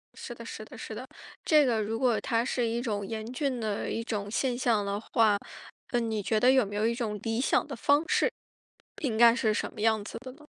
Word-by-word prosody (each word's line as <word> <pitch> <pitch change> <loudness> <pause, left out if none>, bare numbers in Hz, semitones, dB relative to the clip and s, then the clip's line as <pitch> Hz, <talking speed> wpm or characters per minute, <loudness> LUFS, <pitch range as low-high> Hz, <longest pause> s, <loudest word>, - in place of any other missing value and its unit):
是 - - -7
的 - - -10
是 - - -7
的 - - -12
是 - - -7
的。 - - -7 0.4
这 305 -2 +5
个 230 -4 +1
如 225 +2 -2
果 245 -4 +2
它 230 -1 +1
是 245 -3 0
一 235 +1 -1
种 205 -5 -2
严 220 +1 -5
峻 260 -2 -1
的 215 -2 -2
一 230 - -2
种 205 -3 -3
现 245 +3 0
象 230 -5 +1
的 200 +1 -2
话， 220 -2 +2 0.5
那 240 - +2
你 220 -2 -1
觉 215 +2 +1
得 250 +3 +5
有 260 -3 +4
没 205 +1 -7
有 215 +2 +2
一 230 - +1
种 215 -4 -3
理 225 0 -1
想 - - +2
的 - - -5
方 290 +2 +3
式？ - - +2 0.7
应 235 -7 -1
该 235 0 +7
是 220 -4 +1
什 - - -2
么 210 - -8
样 220 -1 +2
子 210 - -7
的 260 0 -9
呢？ 300 +1 -17
230 Hz, 260 characters per minute, -29 LUFS, 215-250 Hz, 0.7 s, 该